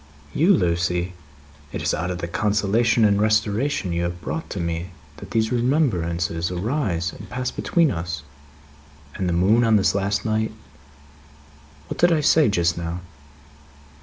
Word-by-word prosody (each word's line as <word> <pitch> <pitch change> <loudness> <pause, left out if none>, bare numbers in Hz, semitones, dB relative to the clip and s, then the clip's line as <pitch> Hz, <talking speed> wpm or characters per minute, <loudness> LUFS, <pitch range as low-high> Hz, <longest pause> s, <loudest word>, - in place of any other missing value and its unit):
"You, 170 +7 +4
Lucie? 90 - 0 0.6
It - - -4
is - - +1
out 90 +2 -2
of 90 - -3
the 85 - -4
Consolation 105 +4 +2
and 100 -1 +3
restoration 110 +1 +1
you 85 - -1
have 85 0 -3
brought 160 - -5
to 100 - -5
me, 85 +1 -3 0.3
that - - -10
these 110 0 0
remembrances 85 - 0
arise, 90 - -1
and - - -11
pass 125 0 -3
between 165 -5 +1
us 85 -2 -4 0.9
and 90 -2 -2
the - - 0
moon 100 +7 +3
on 110 -1 +4
this 100 - +3
last 100 +1 -1
night. 110 0 0 1.3
What - - -6
did 175 +1 +5
I 160 -2 +3
say 150 -2 +4
just 85 -4 +1
now?" 85 +1 -4
100 Hz, 155 wpm, -23 LUFS, 85-115 Hz, 1.3 s, did